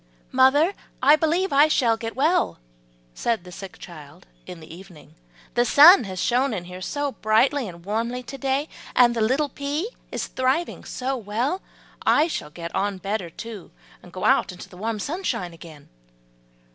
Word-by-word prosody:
"Mother, 275 +8 +4 0.3
I 290 +3 +7
believe 330 +3 0
I 290 +2 +6
shall 240 -7 +2
get 225 0 -6
well," 320 +7 +1 0.6
said 230 - -1
the 180 - -12
sick 190 +1 -9
child 155 -1 -12 0.2
in 180 -2 -8
the 160 0 -12
evening, 180 -3 -15 0.4
"the 240 - +3
sun 295 - +8
has 185 -1 -6
shone 250 +2 +1
in 175 - -4
here 180 +1 -9
so 285 +7 -2
brightly 245 +4 +2
and 170 -1 -11
warmly 230 +4 -2
to 275 - -8
day, 275 +2 0 0.3
and 240 -1 +5
the 230 - -1
little 265 +7 +2
pea 290 - -3 0.2
is - - -3
thriving 260 +7 -1
so 260 +1 -3
well: 245 - -2 0.4
I 300 - +4
shall 310 - -4
get 170 +1 -8
on 200 0 -1
better, 195 -1 -3
too, 215 +2 -9 0.3
and - - -15
go - - -5
out - - +3
into 180 - -10
the - - -15
warm 220 +3 -3
sunshine 210 - -3
again." 160 -3 -13
235 Hz, 170 wpm, -24 LUFS, 185-285 Hz, 0.6 s, sun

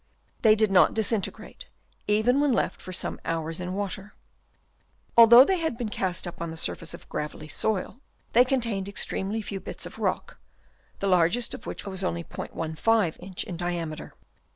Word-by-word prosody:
They 215 -2 +6
did 215 -2 +2
not 190 - +5
disintegrate, 225 - -2 0.4
even 220 +6 +3
when 290 -2 +3
left 235 - 0
for 185 - -8
some 185 - -3
hours 165 0 -3
in 180 +1 -4
water. 200 0 -5 1.0
Although 235 +2 +10
they 380 +1 +1
had 320 -8 -2
been 235 -3 -3
cast 185 -3 -2
up 175 - -8
on 170 - -3
the 160 - -7
surface 165 +1 -3
of - - -15
gravelly 150 0 -5
soil, 205 - -2 0.3
they 245 - +7
contained 230 -7 -1
extremely 200 +1 -1
few 200 -1 -5
bits - - -4
of - - -10
rock, - - -2 0.6
the 200 - -2
largest 185 +6 +2
of - - -9
which - - -5
was 190 -1 -4
only 170 -2 -2
'15 165 +5 -1
inch 185 0 -5
in 185 - -6
diameter. 170 -3 -4
195 Hz, 170 wpm, -26 LUFS, 175-225 Hz, 1.0 s, Although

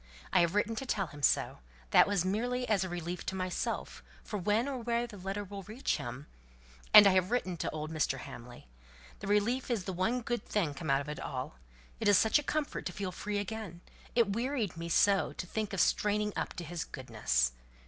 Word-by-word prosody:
I 185 - +6
have 170 +2 +2
written 210 +2 +1
to 270 - -3
tell 200 -5 0
him 150 -4 -11
so. - - +2 0.3
That - - +7
was 200 -3 +1
merely 245 +6 -1
as 205 -4 +2
a 185 - -4
relief 175 0 -4
to 190 - -2
myself, 185 -1 -3 0.2
for 210 - -4
when 210 +7 +1
or 270 -2 -3
where 235 0 0
the 235 -3 -10
letter 195 +2 -4
will 200 0 -7
reach 215 +7 -2
him 125 +4 -6 0.7
And 210 - +11
I 200 - +7
have 185 0 +2
written 210 -7 0
to - - -2
old 155 0 -5
Mr. 155 -4 0
Hamley. 120 - -10 0.5
The - - -6
relief 215 +6 +1
is 230 -6 0
the 190 - -4
one 220 +8 0
good 240 -2 -2
thing 175 -9 0
come 140 +2 -6
out 135 0 +3
of 140 - -7
it 150 - -5
all. 130 - -5 0.4
It - - 0
is 205 -2 +7
such 220 +8 +4
a - - -5
comfort 305 0 -2
to - - -4
feel 195 -1 -3
free 205 +3 -3
again. 205 -4 -5 0.3
It 225 -5 +3
wearied 235 - -1
me 165 +1 -5
so 195 +3 +3
to - - -5
think 215 +3 -3
of 195 - -3
straining 210 +3 +2
up - - -2
to 175 - -5
his 170 +1 -4
goodness. 65 - 0
195 Hz, 220 wpm, -32 LUFS, 170-220 Hz, 0.7 s, And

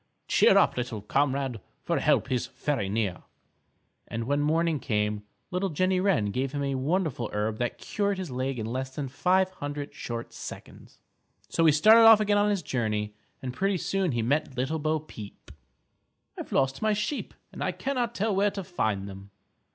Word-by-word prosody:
Cheer - - +5
up, - - +4
little 120 -4 -3
comrade, 135 -1 0 0.2
For - - 0
help 130 - +2
is 125 -2 0
very 125 -10 -2
near._" 100 -3 -1 0.9
And 115 - -3
when 145 +4 0
morning 160 +1 +1
came 105 -4 -1 0.3
Little 185 +2 0
Jenny 185 +3 +1
Wren 175 - +2
gave 130 +4 -2
him 145 -1 -2
a 140 -1 -1
wonderful 140 - -1
herb 105 +1 -2
that 120 -1 -2
cured 200 -1 -1
his 185 -6 -5
leg 130 +1 -2
in 110 - -3
less 130 +3 -4
than 145 -3 -3
five 185 +7 +2
hundred 145 -4 -6
short 120 0 -6
seconds. - - -10 0.5
So 165 - +2
he 160 - +7
started 215 +10 +7
off 225 -1 +9
again 205 -1 +2
on 205 0 +3
his 200 -4 0
journey 110 -6 -1 0.3
and 125 -1 -4
pretty 195 +6 0
soon 190 -3 -1
he 120 -1 0
met 140 +2 0
Little 135 +6 -1
Bo 155 +1 0
Peep. 110 -9 -11 0.8
"I've - - -8
lost 135 0 +1
my 215 -1 +2
sheep 210 +7 -3 0.2
and - - -8 0.2
cannot 245 -4 -1
tell 210 0 0
where 200 +2 +3
to 195 -1 -5
find 110 - -2
them." 100 0 -10
145 Hz, 180 wpm, -27 LUFS, 120-185 Hz, 0.9 s, off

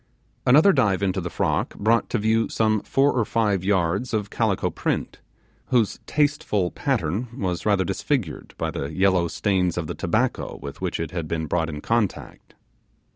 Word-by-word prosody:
Another 155 +10 +7
dive 100 -8 +2
into 95 -1 0
the 90 - -4
frock - - -1
brought 115 +3 +2
to - - 0
view 110 +1 +1
some 110 -2 +1
four 140 +1 +2
or 120 - +1
five 105 -4 0
yards 95 +4 +1
of 105 -2 -2
calico - - 0
print, - - -2 0.5
whose 120 -5 +1
tasteful 145 -11 +1
pattern 120 - -1
was 90 -4 -2
rather 100 -2 +3
disfigured 95 - -2
by - - -2
the 70 - -4
yellow 95 -2 +2
stains 90 0 0
of 85 - -1
the - - -4
tobacco - - -1
with 70 +3 -8
which 90 -2 -2
it 80 -2 -3
had 85 -3 -4
been 80 0 -2
brought 80 +1 0
in 75 -2 -6
contact. 115 0 -2
100 Hz, 170 wpm, -24 LUFS, 85-115 Hz, 0.5 s, Another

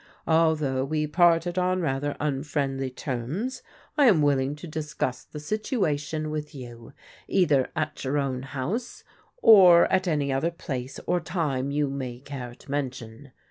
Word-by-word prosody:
Although 155 -5 +2
we 155 +1 -1
parted 175 +2 +3
on 185 0 +1
rather 145 -3 -1
unfriendly 135 -2 -2
terms, 135 - -4 0.4
I 285 - +7
am 185 - +5
willing 140 -1 +1
to 150 - -10
discuss 150 -5 -3
the 150 - -9
situation 155 - -2
with 150 0 -5
you 120 -1 -10 0.3
either 150 -9 +2
at 155 -1 -3
your 135 +2 -1
own 135 -3 -1
house 140 - -4 0.4
or 185 -6 +8
at 190 0 +2
any 145 -4 0
other 135 +5 +1
place 135 -6 -6
or 180 - +1
time 155 -6 -2
you 145 +1 0
may 130 -3 -5
care 130 -3 -7
to 135 - -13
mention. 130 -2 -5
145 Hz, 145 wpm, -26 LUFS, 135-165 Hz, 0.4 s, or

